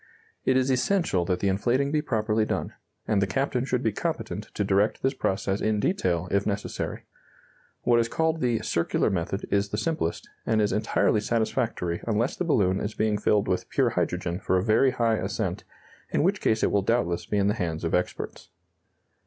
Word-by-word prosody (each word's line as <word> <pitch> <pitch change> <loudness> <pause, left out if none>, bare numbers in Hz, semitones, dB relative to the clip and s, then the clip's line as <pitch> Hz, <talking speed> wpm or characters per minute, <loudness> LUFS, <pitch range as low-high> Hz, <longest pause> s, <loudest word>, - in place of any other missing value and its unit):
It 130 - +4
is 130 +1 +2
essential 130 - +1
that 90 0 -1
the 100 - +1
inflating 120 +8 +1
be 150 0 +2
properly 110 -6 0
done, - - -2 0.3
and 105 -2 +2
the 100 - +2
captain 130 +1 0
should 125 -2 -1
be 110 - +2
competent - - -3
to - - 0
direct 100 +3 +1
this 135 - +2
process 95 -4 -1
in 110 -1 +1
detail, 90 - 0
if 100 0 +1
necessary. 100 -1 -3 0.8
What 120 -1 +4
is 115 0 +1
called 160 +3 0
the 120 -3 +1
"circular 85 - +1
method" 95 +2 -2
is 100 0 +1
the 105 - -3
simplest, 110 - -2 0.2
and 110 -1 +1
is 105 -1 +2
entirely 105 0 +2
satisfactory 105 -6 -1
unless 115 +3 +1
the 180 - -2
balloon 100 - +2
is 105 - -4
being 105 -1 +1
filled 105 -1 +2
with - - -1
pure - - +2
hydrogen 85 +1 -1
for 95 - +1
a 90 - +1
very 115 +5 +4
high 115 -3 +1
ascent, - - -3 0.4
in - - +1
which - - +1
case 110 0 +1
it - - +2
will 100 - +3
doubtless 90 -5 0
be 105 - 0
in 100 - +2
the 105 - +3
hands 85 -6 -3
of 80 - -1
experts. 90 - -2
105 Hz, 195 wpm, -26 LUFS, 95-120 Hz, 0.8 s, It